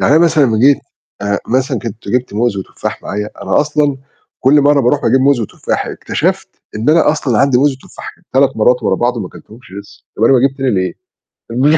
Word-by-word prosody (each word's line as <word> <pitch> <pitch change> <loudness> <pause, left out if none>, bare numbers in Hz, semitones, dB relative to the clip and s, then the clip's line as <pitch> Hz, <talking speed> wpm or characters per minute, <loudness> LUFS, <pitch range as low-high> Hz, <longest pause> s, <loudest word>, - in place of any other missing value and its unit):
يعني - - +3
أنا - - +4
مثلًا 155 -3 +3
لمّا 110 -4 +1
جيت 135 +4 +5 0.4
آآ، 100 0 0
مثلًا 130 0 0
كنت 115 0 -8
جِبت 125 -4 -1
موز 115 -2 0
وتفاح 95 - -6
معايا، 105 +1 -4
أنا 95 +8 +1
أصلًا 150 -2 0 0.4
كل 145 +3 +4
مرّة 145 0 +3
باروح 135 +3 +1
أجيب 130 +3 +3
موز 135 -2 +3
وتفاح. 105 - -3
اكتشفت - - -2 0.3
إن 115 +7 +1
أنا 160 -2 +4
أصلًا 130 -8 -1
عندي 135 -3 +3
موز 145 +2 +3
وتفاح - - -11
كان - - -30
3 135 -1 +2
مرّات 125 +3 +2
ورا - - +1
بعض 120 0 0
وما 95 -5 -4
كلتهمش 110 -3 -16
لسّه. 100 - -18
طَب 110 - +1
أنا 135 - +5
باجيب 135 +1 +2
تاني 135 -2 0
ليه؟ 95 -3 -1 0.6
الم 145 +6 +3
125 Hz, 210 wpm, -15 LUFS, 110-140 Hz, 0.6 s, جيت